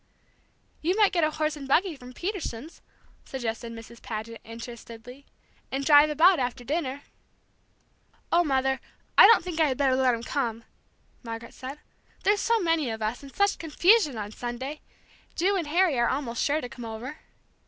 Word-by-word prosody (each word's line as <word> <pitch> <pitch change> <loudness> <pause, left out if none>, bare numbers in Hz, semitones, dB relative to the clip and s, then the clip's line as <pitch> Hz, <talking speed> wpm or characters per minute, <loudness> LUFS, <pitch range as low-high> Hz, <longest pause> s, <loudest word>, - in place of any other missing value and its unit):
"You 360 +5 0
might 420 -2 +5
get 345 -4 +1
a 310 - +3
horse 310 0 -1
and 280 -2 -8
buggy 340 +5 +2
from 250 -2 -12
Peterson's," 330 - -5 0.4
suggested 235 -2 -5
Mrs. 230 0 -11
Paget, 225 +1 -6
interestedly, 235 +3 -10 0.4
"and 275 +1 -2
drive 295 0 +7
about 330 +4 +5
after 245 -1 -2
dinner." 285 0 -3 1.3
"Oh, 345 +1 +5
Mother, 265 -3 +1 0.4
I - - +10
don't 455 -4 +6
think 345 -2 -5
I 315 - +5
had 260 -3 -1
better 270 -2 +3
let 260 -2 +3
him 230 - -8
come!" 230 -4 -2 0.6
Margaret 230 -1 -7
said. 260 +3 -8 0.5
"There's 410 +1 +3
so 460 0 +2
many 330 - +1
of 220 -1 -4
us, 220 +3 -2
and 275 -1 -11
such 400 +4 +1
confusion, 330 - +3
on 210 -1 -5
Sunday! 250 +6 -5 0.5
Ju 385 +4 +2
and 345 -5 -1
Harry 330 -3 +2
are 235 - +3
almost 255 -4 -2
sure 300 +2 +1
to 245 - -5
come 245 0 -10
over." 230 +7 -7
275 Hz, 170 wpm, -27 LUFS, 235-325 Hz, 1.3 s, I